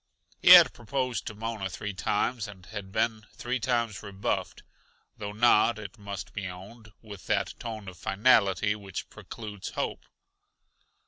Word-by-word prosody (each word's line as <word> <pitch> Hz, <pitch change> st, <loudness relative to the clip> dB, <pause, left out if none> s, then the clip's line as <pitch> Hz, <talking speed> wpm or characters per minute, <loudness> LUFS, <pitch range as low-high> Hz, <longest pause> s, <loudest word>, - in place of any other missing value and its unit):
He -, -, +4 dB
had -, -, +10 dB
proposed 125 Hz, +2 st, -3 dB
to 110 Hz, -, -5 dB
Mona 110 Hz, -2 st, -4 dB
three 105 Hz, +2 st, -5 dB
times, 105 Hz, +5 st, -1 dB
and 95 Hz, -3 st, -12 dB
had 100 Hz, -3 st, -8 dB
been 110 Hz, 0 st, -1 dB
three 125 Hz, +1 st, -2 dB
times 115 Hz, -3 st, -1 dB
rebuffed 100 Hz, -1 st, -3 dB, 0.6 s
though 105 Hz, -1 st, -4 dB
not, 110 Hz, 0 st, +4 dB
it 110 Hz, +1 st, -9 dB
must 100 Hz, -3 st, -7 dB
be 100 Hz, -2 st, -4 dB
owned, 105 Hz, +5 st, -11 dB
with 100 Hz, -4 st, -11 dB
that -, -, 0 dB
tone 110 Hz, -4 st, -6 dB
of 90 Hz, -2 st, -9 dB
finality 100 Hz, -2 st, +3 dB
which 100 Hz, -3 st, -7 dB
precludes 105 Hz, -4 st, -8 dB
hope. -, -, -3 dB
105 Hz, 145 wpm, -28 LUFS, 100-115 Hz, 0.6 s, had